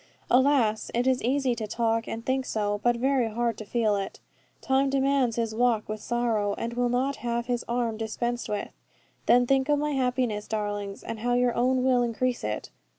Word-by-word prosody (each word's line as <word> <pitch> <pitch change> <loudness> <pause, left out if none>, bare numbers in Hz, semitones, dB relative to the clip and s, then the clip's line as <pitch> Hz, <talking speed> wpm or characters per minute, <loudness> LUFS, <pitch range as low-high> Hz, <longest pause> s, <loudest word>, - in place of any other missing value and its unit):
Alas, 250 -4 +3
it 240 +1 +1
is 260 -1 +2
easy 260 +1 +1
to 220 -2 -4
talk 225 +1 0
and 225 +1 -5
think 260 0 +1
so, 205 -4 -1
but 240 0 +3
very 260 -1 +1
hard 235 +1 -1
to - - -5
feel 215 -1 +1
it. 195 -1 -4 0.4
Time 270 +1 +2
demands 270 -3 +2
his 230 -2 -1
walk 230 -2 +1
with 215 0 -5
sorrow, 225 -4 0
and 230 +1 -3
will 245 0 +1
not 260 +3 0
have 235 0 -2
his 245 -1 -1
arm 235 -2 -1
dispensed 240 +2 -3
with. 205 -1 -3 0.6
Then 245 0 +5
think 270 +2 +2
of 295 - +4
my 300 +1 -1
happiness, 250 -5 0
darlings, 205 -2 -3
and 225 - -5
how 245 +2 +1
your 245 -1 +2
own 255 +2 +2
will 255 -1 +3
increase 245 +1 -1
it. 105 0 -4
240 Hz, 195 wpm, -27 LUFS, 220-255 Hz, 0.6 s, Then